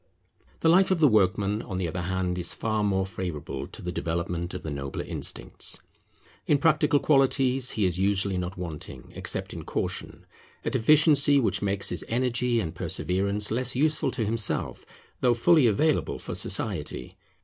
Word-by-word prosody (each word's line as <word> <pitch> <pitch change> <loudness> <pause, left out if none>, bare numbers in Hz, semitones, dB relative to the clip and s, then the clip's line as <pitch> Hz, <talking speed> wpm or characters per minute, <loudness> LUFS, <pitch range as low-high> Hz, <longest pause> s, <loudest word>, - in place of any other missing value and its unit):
The - - +2
life 185 +4 +5
of 185 -3 +1
the 155 - +6
workman, 105 -1 +2
on 95 - -6
the 90 -2 -1
other 90 +2 -4
hand, 90 0 -2
is 85 - -2
far 110 -1 -1
more 95 -2 +1
favourable 90 -6 -5
to - - -11
the 90 - -3
development 85 +1 -3
of 90 - -6
the 80 - -5
nobler 70 -1 -4
instincts. - - -2 0.7
In 150 - +4
practical 150 0 +3
qualities 135 -3 +2
he 105 - +2
is 90 -1 0
usually 95 -1 +1
not 90 +2 -5
wanting, 85 -4 -7
except - - -3
in - - -7
caution, - - -4 0.4
a - - 0
deficiency 145 +2 +5
which 120 - 0
makes 100 -1 0
his 90 - -3
energy 125 0 +1
and 80 -7 -3
perseverance 100 +4 0
less 125 +2 -1
useful 155 +3 +2
to 120 -4 -2
himself, 110 0 -1 0.3
though 120 -1 +3
fully 150 +2 +4
available 150 +9 +1
for - - -7
society. 60 - -2
105 Hz, 165 wpm, -26 LUFS, 90-130 Hz, 0.7 s, the